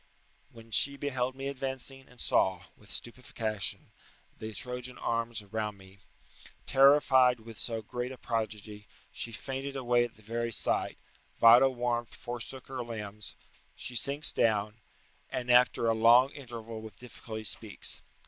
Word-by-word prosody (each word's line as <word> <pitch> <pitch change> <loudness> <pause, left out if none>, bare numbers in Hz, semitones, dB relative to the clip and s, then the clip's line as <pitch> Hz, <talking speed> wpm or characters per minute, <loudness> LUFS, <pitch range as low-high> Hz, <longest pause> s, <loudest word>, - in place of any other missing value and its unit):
["When 115 -3 -15
she 140 +5 +7
beheld 130 -3 -2
me 135 +1 -5
advancing, 135 -1 -4
and 125 - -19
saw, 95 -5 +1
with 105 - -19
stupefaction, 110 -6 -4 0.4
the 110 0 -7
Trojan 125 +3 -4
arms 115 -2 -1
around 105 0 -4
me, 95 0 -17 0.7
terrified 130 -2 +5
with 115 -1 -11
so 115 -2 -3
great 125 +3 -4
a 130 - -9
prodigy, 110 -3 -4 0.2
she 115 - -4
fainted 135 +4 -5
away 120 -2 +2
at 120 -1 -6
the 110 - -20
very 115 +2 -3
sight: - - 0 0.4
vital 125 +3 +7
warmth 120 -1 -2
forsook 120 +2 -6
her 130 -1 -5
limbs: 105 -3 -7 0.4
she 125 - -4
sinks 140 +4 +4
down, 110 0 0 0.5
and, 125 -1 -2
after 125 -1 +4
a 115 - +3
long 120 +4 +5
interval, 115 -5 -8
with 110 -4 -11
difficulty 115 -2 -9
speaks." 105 - -3
120 Hz, 140 wpm, -30 LUFS, 110-130 Hz, 0.7 s, she